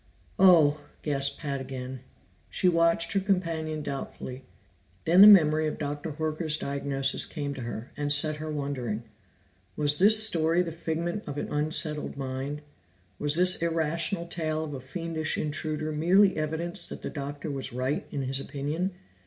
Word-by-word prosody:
"Oh!" 155 -6 +5 0.2
gasped 140 -2 0
Pat 140 -3 -4
again. 130 0 -7 0.5
She 185 - 0
watched 170 -1 +3
her 200 - +2
companion 165 -5 -2
doubtfully. 135 -2 -6 0.6
Then 175 +4 +6
the 205 - +11
memory 155 -6 +6
of 155 - -4
Dr. 145 +1 -4
Horker's 155 0 -1
diagnosis 140 -1 -1
came 145 -3 -4
to 135 - -8
her, 120 0 -7
and 145 0 -2
set 150 +1 +4
her 155 0 -5
wondering. 130 -7 -4 0.7
Was 145 0 +3
this 215 +3 +7
story 170 -4 +3
the 170 - -5
figment 170 +4 -3
of 145 -1 -6
an - - -4
unsettled 150 0 -1
mind? 135 +2 -5 0.6
Was 145 0 +4
this 180 +1 +4
irrational 165 +2 -1
tale 160 -2 -3
of 150 -2 -6
a 135 - -6
fiendish 160 +3 -4
intruder 155 0 -3
merely 185 +6 +3
evidence 160 +3 +1
that - - -8
the - - -4
Doctor 145 +1 -6
was 135 -1 -5
right 130 +5 -2
in 140 - -4
his 135 +1 -2
opinion? 155 +7 -4
155 Hz, 155 wpm, -27 LUFS, 140-165 Hz, 0.7 s, the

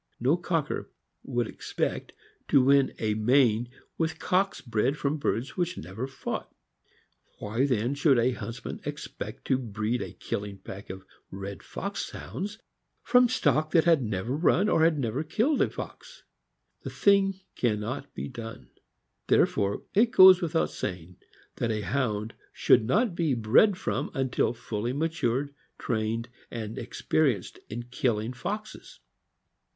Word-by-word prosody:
No 130 +7 +3
cocker 165 -4 -2 0.3
would 120 -1 -1
expect - - -3 0.3
to 135 - +5
win 140 0 +4
a 110 -1 0
main 120 +1 +3 0.3
with 160 -1 0
cocks 190 +3 +1
bred 120 +3 0
from 145 +1 -1
birds 125 0 -1
which 175 -1 -1
never 95 +10 -5
fought. 135 - -5 0.9
Why, 115 +7 0
then, 125 0 +1
should 140 -2 +3
a 120 +2 +3
huntsman 120 0 -6
expect 135 -5 -7
to 130 -2 +2
breed 115 0 -2
a - - -6
killing 100 -1 -5
pack 95 +1 -10
of 95 +1 -8 0.2
red 100 +1 -7
fox - - -5
Hounds 195 - -6 0.5
from 250 -1 +5
stock 155 - +2
that 165 -2 +6
had 165 -4 +4
never 110 +2 -2
run 180 +6 +3
or 160 +1 +5
never 135 -3 -2
killed 230 - +1
a - - +3
fox? - - -9 0.6
The - - -6
thing 195 -1 +3 0.2
can 110 -4 +1
not 130 +7 -5
be - - -4
done. 115 -3 -9 0.6
Therefore 100 0 +2
it 225 +4 +4
goes 185 -3 +8
without 165 -1 0
saying, 90 0 -5 0.4
that 120 - -1
a 110 -1 -1
Hound 110 0 -1 0.2
should 120 - +4
not 210 - +2
be 165 -6 +1
bred 120 - +4
from - - -2
until 135 -4 +1
fully 115 +2 -3
matured, 145 -3 -1 0.2
trained, 115 0 -2 0.2
and 110 -2 -5
experienced 120 - 0
in 120 +3 -5
killing 120 -2 -1
foxes. 210 - -6
130 Hz, 140 wpm, -28 LUFS, 110-160 Hz, 0.9 s, goes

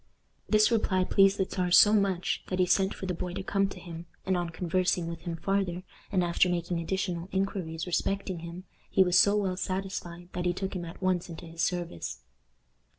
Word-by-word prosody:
This 215 +1 +5
reply 190 -5 +2
pleased 195 +1 +4
the 190 - +1
Czar 180 -1 -2
so 205 +4 +7
much 195 -4 +1
that 185 - -2
he 185 - +4
sent 190 +2 +2
for - - -6
the 185 - -1
boy 180 +1 -4
to 195 - -4
come 195 0 +1
to - - -9
him, 170 -1 -9 0.2
and 185 - +1
on 175 -1 -1
conversing 180 +1 0
with 165 0 -6
him 170 0 -4
farther, 185 +1 -1 0.3
and 185 -3 +2
after 175 +1 +3
making 175 0 -1
additional 180 0 -2
inquiries 185 -4 -2
respecting 190 0 -1
him, 170 +2 -8 0.3
he 190 - +5
was 180 0 +4
so 205 +2 +5
well 190 -3 -1
satisfied 185 -2 -4
that 175 0 -3
he 175 - +2
took 190 +2 -4
him 175 -1 -3
at 170 +3 -10
once 185 -1 +1
into 170 +1 -8
his 165 0 -6
service. 175 - -2
180 Hz, 205 wpm, -29 LUFS, 170-195 Hz, 0.3 s, so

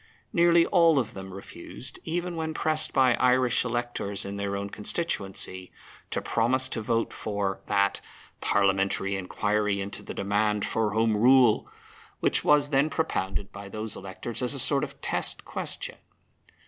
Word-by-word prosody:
Nearly 170 -1 +5
all 170 -5 +4
of 120 -4 0
them 95 0 -8
refused, 95 +6 -10
even 175 +1 -3
when 160 -1 -3
pressed 155 0 0
by 130 -2 +4
Irish 125 -1 +3
electors 120 -4 -3
in 100 0 -5
their 100 0 -3
constituencies, 100 - -3 0.4
to - - -2
promise 130 +3 +1
to 115 - -3
vote 115 +1 -1
for 100 -2 -3
that 100 -1 +1 0.4
"parliamentary 100 0 +1
inquiry 105 +2 0
into 100 +1 -5
the - - -8
demand 105 +1 0
for 110 -2 0
Home 110 0 +2
Rule," 125 0 +5 0.5
which - - +1
was 150 0 +4
then 140 +2 +3
propounded 100 -12 -2
by 100 0 -9
those 110 +1 -4
electors 95 +5 -5
as 125 +3 0
a - - -1
sort 140 +2 +5
of - - -6
test - - 0
question. - - -4
110 Hz, 150 wpm, -27 LUFS, 100-130 Hz, 0.5 s, Nearly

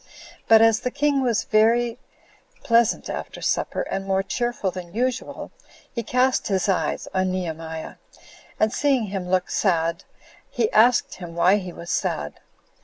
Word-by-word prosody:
But 225 0 +7
as 225 0 +4
the 250 - -2
king 285 +1 +1
was 235 -4 +1
very 230 +2 +2 0.6
pleasant 230 -1 +2
after - - -6
supper, - - -1
and 195 0 -4
more 195 0 +1
cheerful 240 -3 -2
than 180 0 -9
usual, 250 +1 -3 0.4
he 235 - -2
cast 250 +3 +1
his 190 -2 0
eyes 195 - -1
on 185 0 +1
Nehemiah, 160 -3 -5 0.6
and 215 +1 +2
seeing 275 -4 +2
him 190 -3 -4
look 185 -1 0
sad, 170 -4 0 0.5
he 230 -3 0
asked 230 +2 +4
him 175 -2 -9
why 180 +4 +4
he 185 -3 -6
was 170 0 -8
sad. 75 -1 -2
210 Hz, 150 wpm, -23 LUFS, 180-240 Hz, 0.6 s, But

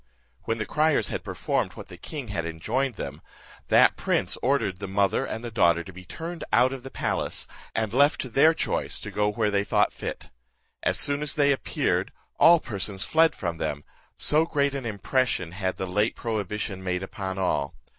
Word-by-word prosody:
When 115 - -1
the 110 - -2
criers 155 +6 +2
had - - -4
performed - - -1
what - - -10
the - - -9
king 140 -7 -7
had 85 -5 -2
enjoined 115 +11 -1
them, - - -6 0.5
that - - +5
prince - - +1
ordered 120 -9 +1
the 100 - -5
mother 100 0 +1
and 115 - -5
the 120 - -5
daughter 85 -6 +3
to 95 - -11
be 90 +1 -11
turned 165 - -6
out 125 +2 +4
of 135 - -6
the 135 - -8
palace, - - -2 0.3
and 110 -1 -1
left 140 +3 +4
to 130 - -5
their 155 +7 +5
choice - - -1
to - - -7
go 105 0 +1
where 105 -1 0
they 100 0 +2
thought 105 0 +2
fit. - - -6 0.5
As - - +2
soon 145 0 +2
as 150 -2 -2
they 145 -1 +4
appeared, 135 - 0 0.3
all 170 0 +8
persons 100 -6 -2
fled 160 0 +4
from 85 -4 -3
them, 75 -2 -3 0.3
so 155 +2 +4
great 140 -4 0
an 135 -4 -4
impression 110 -3 0
had 95 0 -3
the 95 - -2
late 105 +5 0
prohibition 105 -3 -3
made 90 0 -1
upon 95 0 -5
all. 85 -7 0
110 Hz, 195 wpm, -26 LUFS, 95-135 Hz, 0.5 s, all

